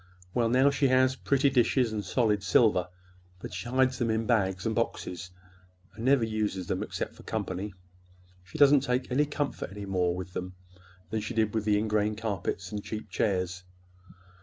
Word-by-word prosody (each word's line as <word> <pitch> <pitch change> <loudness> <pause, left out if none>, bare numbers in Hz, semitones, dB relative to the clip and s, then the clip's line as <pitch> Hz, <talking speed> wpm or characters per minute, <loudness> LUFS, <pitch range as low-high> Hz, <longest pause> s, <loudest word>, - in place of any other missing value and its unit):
Well, 115 -2 +2
now 130 +4 +4
she 140 0 +2
has 130 0 +3
pretty 140 +1 +2
dishes 125 -2 +2
and 105 -1 -2
solid 105 -4 +1
silver—but 90 -3 -1
she 90 +6 -5
hides 130 0 +2
them 120 -2 +1
in 110 0 0
bags 95 -5 +1
and 110 - +1
boxes, 90 -3 -3 0.6
and 110 - -8
never 135 -2 +4
uses 105 -4 -2
them - - -2
except - - -4
for - - -15
company. 95 +2 -4 0.7
She 95 - -10
doesn't 145 -1 +7
take 125 -1 -1
any 145 +4 +3
more - - -14
comfort 145 -8 -3 0.4
with 90 0 -7
them 90 0 -5 0.6
than 110 0 -1
she 110 +3 -5
did 110 -2 +1
with 110 -2 -1
the 105 -1 +3
ingrain 105 0 +1
carpets 100 -3 -3
and 105 -1 -4
cheap 110 -1 -6
chairs. 95 -2 -1
110 Hz, 170 wpm, -29 LUFS, 95-125 Hz, 0.7 s, doesn't